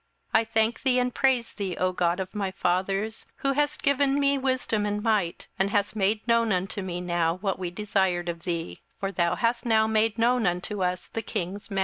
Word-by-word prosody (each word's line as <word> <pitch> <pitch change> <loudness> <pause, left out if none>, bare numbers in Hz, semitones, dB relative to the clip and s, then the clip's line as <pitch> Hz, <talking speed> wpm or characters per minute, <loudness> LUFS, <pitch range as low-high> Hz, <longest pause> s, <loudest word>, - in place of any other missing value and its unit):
27:002:023 220 - +6
I - - -5
thank 225 +1 +2
thee, 255 -1 +3
and 250 0 0
praise 260 -3 +1
thee, 195 -4 -4
O 185 - +1
thou - - -3
God 175 0 0
of 190 -1 -4
my 200 -3 -1
fathers, 195 +4 -1
who 275 0 0
hast 290 0 0
given 280 0 +3
me 280 0 +3
wisdom 255 -6 0
and 205 0 -2
might, 205 -7 0
and 195 +1 +2
hast 205 +1 0
made 210 +2 0
known 230 -1 +3
unto 190 +2 -1
me 180 -2 -4
now 175 -2 0
what 195 +1 -2
we 180 -2 -2
desired 190 -2 0
of 170 -1 -4
thee: 170 - -4 0.2
for 195 0 -2
thou 170 -3 +1
hast 235 0 0
now 220 -2 +3
made 220 0 +1
known 235 -2 +3
unto 180 +3 -2
us 180 0 -1
the 225 - -4
king's 195 +1 -4
matter. 195 -2 -1
205 Hz, 220 wpm, -26 LUFS, 180-230 Hz, 0.2 s, 27:002:023